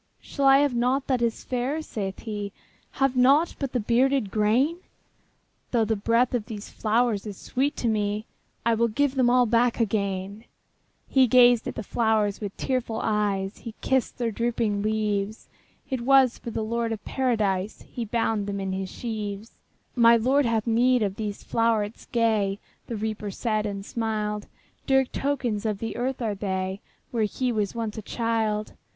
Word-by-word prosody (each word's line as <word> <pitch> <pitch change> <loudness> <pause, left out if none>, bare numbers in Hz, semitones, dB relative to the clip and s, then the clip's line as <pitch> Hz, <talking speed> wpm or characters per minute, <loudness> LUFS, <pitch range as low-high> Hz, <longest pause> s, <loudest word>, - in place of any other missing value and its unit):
``Shall 280 - -2
I 270 0 +8
have 290 -3 +2
nought 250 +3 +1
that 255 -3 0
is 235 -1 -1
fair?'' 260 +5 -2
saith 195 -8 -5
he; 205 -3 -4 0.4
``Have 270 -1 +1
nought 275 +7 +4
but 275 -3 -2
the 250 - 0
bearded 245 0 +2
grain? 230 +10 +2 0.9
Though 230 -3 +2
the 220 +1 0
breath 230 +5 +2
of 230 -4 -1
these 215 -3 -7
flowers 220 -1 +1
is 200 -3 -7
sweet 280 +3 -1
to 240 - -2
me, 210 -1 0 0.4
I 230 - +4
will 230 +1 +2
give 270 +5 +1
them 255 -3 +3
all 250 0 +5
back 235 +1 +2
again.'' 200 -1 -1 0.6
He 265 -2 +4
gazed 245 -1 +5
at - - -4
the 225 - -4
flowers 215 -2 +1
with 200 -2 -5
tearful 250 -4 -1
eyes, 205 -2 0
He 225 -2 -8
kissed 265 -2 0
their 235 -2 -1
drooping 225 -2 0
leaves; 215 -1 -1 0.4
It 260 -3 -2
was 265 -1 +4
for - - -6
the 225 -1 -3
Lord 230 +1 -1
of 220 -2 -5
Paradise 215 -7 -1
He 240 - -6
bound 225 -2 -1
them 200 0 -3
in 195 -1 -3
his 190 0 -3
sheaves. 215 -2 -5 0.4
``My 235 -1 +6
Lord 265 +3 +3
has 225 -2 0
need 245 +1 +3
of 195 -2 -1
these 210 -2 -4
flowerets 225 -2 0
gay,'' 215 -4 +1 0.3
The 235 - -4
Reaper 215 -1 -3
said, 215 +1 -1
and 200 -1 -5
smiled; 210 -2 -2 0.4
``Dear 265 -1 +4
tokens 255 -7 -1
of 215 -2 -1
the 225 +2 -5
earth 250 +1 -2
are 215 -2 0
they, 190 -1 -3 0.3
Where 225 -3 +1
he 250 +4 -1
was 210 -1 -1
once 225 -1 -3
a - - -6
child. 220 -1 -1
225 Hz, 175 wpm, -26 LUFS, 210-245 Hz, 0.9 s, I